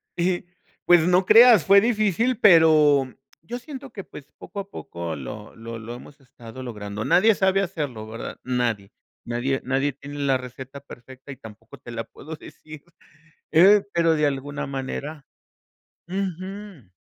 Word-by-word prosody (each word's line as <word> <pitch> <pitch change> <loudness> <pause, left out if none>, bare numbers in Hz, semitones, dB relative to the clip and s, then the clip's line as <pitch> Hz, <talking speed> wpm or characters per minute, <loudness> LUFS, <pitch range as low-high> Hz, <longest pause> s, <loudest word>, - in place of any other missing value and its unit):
Y, 175 +1 -1 0.4
pues, 175 -2 +5
no 180 +1 +3
creas, 230 - +7
fue 200 +3 +7
difícil, 225 +1 +1
pero 155 - +5 0.3
yo 205 +10 -6
siento 270 +1 -10
que, 200 -4 -8
pues, 145 -4 -13
poco 200 - -9
a 200 0 -7
poco 85 - -6
lo 105 +10 -9
lo 115 0 -8
lo 115 +2 -8
hemos 140 +4 -14
estado 125 -1 -12
logrando. 105 -4 -6
Nadie 220 - +4
sabe 190 0 +2
hacerlo, 145 - -4
¿verdad? 115 +1 -7
Nadie 120 -6 -2 0.3
nadie 120 +3 -2
nadie 135 +2 0
tiene 145 +2 -10
la 135 -2 +2
receta 130 +2 -10
perfecta 130 0 -13
y 135 - -10
tampoco 110 +1 -13
te - - -13
la 115 -1 -4
puedo 160 +6 -10
decir, 155 -1 -13 0.7
eh, 195 +5 +6
pero 165 -1 +2
de 150 -1 +1
alguna 145 +1 -3
manera 135 +2 -6 0.8
Ujú. 190 - -6
145 Hz, 150 wpm, -23 LUFS, 125-185 Hz, 0.8 s, creas